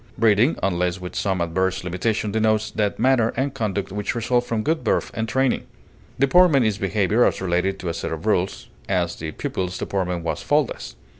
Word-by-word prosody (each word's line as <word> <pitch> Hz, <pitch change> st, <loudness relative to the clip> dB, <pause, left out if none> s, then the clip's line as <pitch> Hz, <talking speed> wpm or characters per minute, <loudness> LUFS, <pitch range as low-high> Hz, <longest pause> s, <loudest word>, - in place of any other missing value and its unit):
Breeding, 115 Hz, +5 st, +3 dB
unless 90 Hz, -1 st, 0 dB
with 90 Hz, -1 st, -8 dB
some 95 Hz, -3 st, 0 dB
adverse 95 Hz, +2 st, 0 dB
limitation, 100 Hz, +4 st, -1 dB
denotes 110 Hz, 0 st, +1 dB
that 105 Hz, -1 st, -1 dB
manner 125 Hz, -3 st, +3 dB
and 135 Hz, +1 st, 0 dB
conduct 100 Hz, -7 st, -2 dB
which 105 Hz, +2 st, -3 dB
result 120 Hz, +1 st, +1 dB
from 115 Hz, -2 st, -2 dB
good 160 Hz, -1 st, 0 dB
birth 110 Hz, -, 0 dB
and 110 Hz, 0 st, -3 dB
training. 130 Hz, +2 st, +1 dB, 0.5 s
Deportment 140 Hz, -1 st, +5 dB
is 105 Hz, -1 st, 0 dB
behavior 100 Hz, +3 st, +2 dB
as -, -, +2 dB
related 95 Hz, +1 st, 0 dB
to 95 Hz, -, -6 dB
a 85 Hz, -, -1 dB
set -, -, -4 dB
of 80 Hz, +4 st, -5 dB
rules; 95 Hz, -3 st, 0 dB, 0.2 s
as, 90 Hz, -3 st, 0 dB
the 80 Hz, 0 st, -5 dB
pupil's 90 Hz, +3 st, -3 dB
deportment 90 Hz, -3 st, -2 dB
was 80 Hz, -3 st, -2 dB
faultless. 145 Hz, -, -1 dB
100 Hz, 180 wpm, -23 LUFS, 90-115 Hz, 0.5 s, Deportment